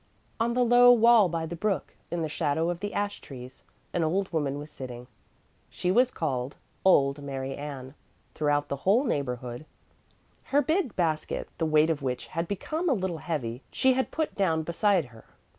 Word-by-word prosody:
On 235 +1 +1
the 250 0 +3
low 245 +1 +7
wall 230 -4 +6
by 165 -1 -2
the 165 +2 -5
brook, 195 -2 -2 0.2
in 170 -1 -2
the - - -1
shadow 160 +2 0
of 175 - -5
the 205 +1 -4
ash 205 0 -2
trees, 130 -1 -11 0.3
an 175 - +1
old 185 +4 -1
woman 145 -3 0
was 150 +1 -8
sitting. 125 -3 -8 0.6
She 180 - -1
was 245 +5 +4
called 135 - -3 0.3
"Old 140 -6 +4
Mary 135 -1 -4
Ann" 140 -2 -7 0.4
throughout 145 -1 +1
the 140 - -3
whole 200 - +3
neighborhood. 125 - -3 0.8
Her 290 +1 +2
big 315 - 0
basket, 160 -3 -1
the 165 - +1
weight 155 +1 +4
of 155 -2 -2
which 125 -3 -3
had 165 +8 -3
become 310 - -2
a - - +4
little 185 -7 -2
heavy, 130 -8 -3
she 260 0 +3
had 260 +1 0
put 315 -1 -2
down 165 -6 +1
beside 175 +1 +2
her. 115 -2 -15
165 Hz, 180 wpm, -27 LUFS, 140-205 Hz, 0.8 s, low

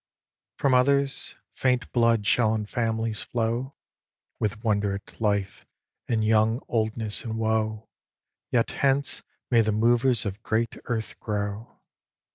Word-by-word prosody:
From 140 -2 +2
others, 140 +2 +2 0.2
faint 125 -1 0
blood 115 -3 +3
shall 110 +2 +3
in 105 -1 -2
families 115 -1 -1
flow, 120 +3 -2 0.6
With 105 +1 -2
wonder 105 -3 +1
at 100 +3 -11
life, 100 -3 0 0.4
and 110 -2 +1
young 110 +2 +3
oldness 110 -1 -1
in 115 -1 -4
woe, 110 -1 0 0.6
Yet 115 -2 +1
hence 140 0 +1 0.3
may 120 -2 +6
the 110 -1 +1
movers 120 +3 +3
of 100 +1 -4
great 115 +1 0
earth 110 -3 -3
grow. 105 +1 -4
110 Hz, 125 wpm, -26 LUFS, 110-120 Hz, 0.6 s, may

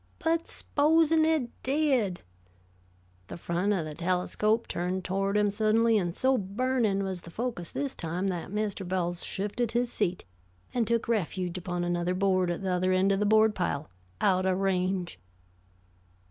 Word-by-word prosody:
"But 330 0 0
supposin' 315 +1 +3
it 310 -7 +1
did?" 260 - +1 1.1
The - - -7
front 175 +4 -1
of 175 -5 -1
the 155 - -6
telescope 185 +6 0
turned 180 +2 -2
toward 195 +2 0
him 205 -1 +2
suddenly, 220 +1 +3
and 175 -3 -2
so 260 0 +2
burning 210 0 0
was 190 -2 -4
the 170 - -11
focus 220 -3 -4
this 280 -2 -3
time 175 +3 -3
that 175 -2 -4
Mr. 210 0 -2
Bowles 175 -1 -2
shifted 210 +4 -2
his 240 0 0
seat, 175 +1 -1 0.5
and 235 -3 +1
took 235 -1 +1
refuge 185 -5 -1
upon 175 -1 -3
another 175 +1 0
board 185 -1 +2
at 175 +2 -3
the 190 - -1
other 185 +1 +1
end 185 +1 +3
of 195 - +1
the 210 - +1
board 220 0 +5
pile, 155 - -2 0.3
out 185 -1 +2
of 185 -1 +2
range. 185 - -1
195 Hz, 160 wpm, -28 LUFS, 180-230 Hz, 1.1 s, board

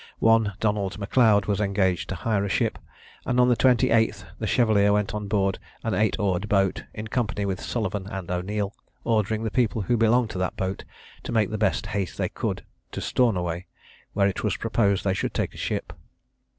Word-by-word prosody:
One 115 -2 +3
Donald 105 -3 0
M'Leod 105 -1 +3
was 105 0 0
engaged 95 -3 0
to 95 - -2
hire 100 +2 0
a 100 - -2
ship, - - 0 0.4
and 125 0 0
on 125 0 +5
the 125 - +4
28th 115 -5 +3
the 110 - -2
Chevalier 105 -3 +3
went 105 -1 +1
on 105 -1 -4
board 100 -2 +1 0.2
an - - -1
eight 110 0 +2
oared 100 -1 -1
boat, 95 -2 +1
in 110 - -6
company 110 -3 -1
with 95 -2 -2
Sullivan 105 -4 -3
and 95 -4 -6
O'Neil, 100 +3 -2 0.3
ordering 110 -1 0
the 110 - -2
people 115 -3 +1
who 120 +5 +1
belonged 115 +1 +3
to 95 - -5
the 95 - 0
boat 95 0 -3 0.4
to - - -6
make 110 -3 +2
the 110 - -2
best 105 - +1
haste 100 -3 -3
they - - -1
could - - -3 0.3
to - - -3
Stornoway, 90 -8 0 0.5
where 100 -1 +3
it 95 - -3
was - - 0
proposed 100 -4 +1
they 95 - +1
should 95 - -3
take - - -2
ship. - - -3
105 Hz, 190 wpm, -25 LUFS, 95-110 Hz, 0.5 s, on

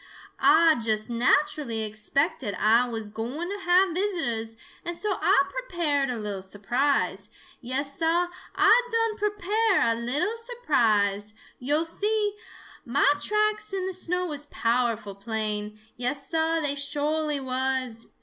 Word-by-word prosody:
"Ah 325 -5 +5
just 215 0 -1
naturally 235 -1 +1
expected 215 - -1
Ah 230 +3 +3
was 220 -2 -5
gwine 255 - -4
to 405 +1 -4
have 360 0 +4
visitors, 320 - -2 0.3
and 345 -1 -4
so 420 0 -2
Ah - - +4
prepared 340 - -1
a 245 - -1
little 205 -3 -4
surprise. 240 +9 -1 0.3
Yes, 275 +3 -1
Sah, 335 +2 +2 0.3
Ah 480 - +6
done 455 -1 +1
prepare 415 0 +1
a 230 - +3
little 280 - -1
surprise. 220 - 0 0.2
Yo' 290 +5 +1
see, 415 +5 -1 0.5
mah 280 +3 +3
tracks 425 +4 0
in 380 -1 -1
the 380 - -3
snow 360 0 -2
was 295 -3 -5
powerful 230 -5 0
plain. 210 0 -3 0.2
Yes, 255 +3 -2
Sah, 325 0 +1
they 290 -2 0
sho'ly 295 +1 -1
was! 260 -3 -2
285 Hz, 130 wpm, -26 LUFS, 230-360 Hz, 0.5 s, Ah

